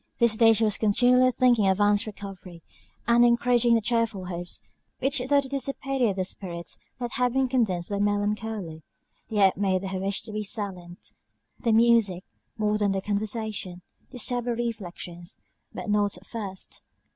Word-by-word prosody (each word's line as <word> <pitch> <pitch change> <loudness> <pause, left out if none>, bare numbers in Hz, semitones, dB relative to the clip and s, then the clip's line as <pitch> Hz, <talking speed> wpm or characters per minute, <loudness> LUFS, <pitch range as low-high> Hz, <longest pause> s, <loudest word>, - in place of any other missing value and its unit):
This 235 -2 +3
day 225 0 +6
she 225 0 +3
was 210 -3 +1
continually 250 +4 +4
thinking 240 -4 +3
of 190 +1 +2
Ann's 205 +1 +3
recovery, 195 -5 -9 0.4
and 235 0 +5
encouraging 240 0 +4
the 225 - +2
cheerful 225 -4 0
hopes, 175 0 -5 0.3
which 270 +1 +1
though 275 +3 +3
they 275 - -3
dissipated 270 -4 -1
the 185 -1 -1
spirits 170 -3 -5 0.2
that 240 -1 -4
had 250 -1 +1
been 265 0 +2
condensed 210 -9 0
by 200 - -1
melancholy, 205 -4 -2 0.5
yet 200 -3 +3
made 190 -1 +1
her 190 -1 -3
wish 195 +1 -2
to 220 - -9
be 215 0 -3
silent. 185 -4 -4 0.5
The 235 - +1
music, 220 -5 +4 0.3
more 210 -1 +1
than 200 -2 +2
the 195 - -1
conversation, 205 -3 -3 0.3
disturbed 245 -1 -2
her 240 - 0
reflections; 180 -7 -5 0.3
but - - -7
not 205 -2 +1
at 185 - -16
first. 195 -4 -5
210 Hz, 160 wpm, -26 LUFS, 190-235 Hz, 0.5 s, day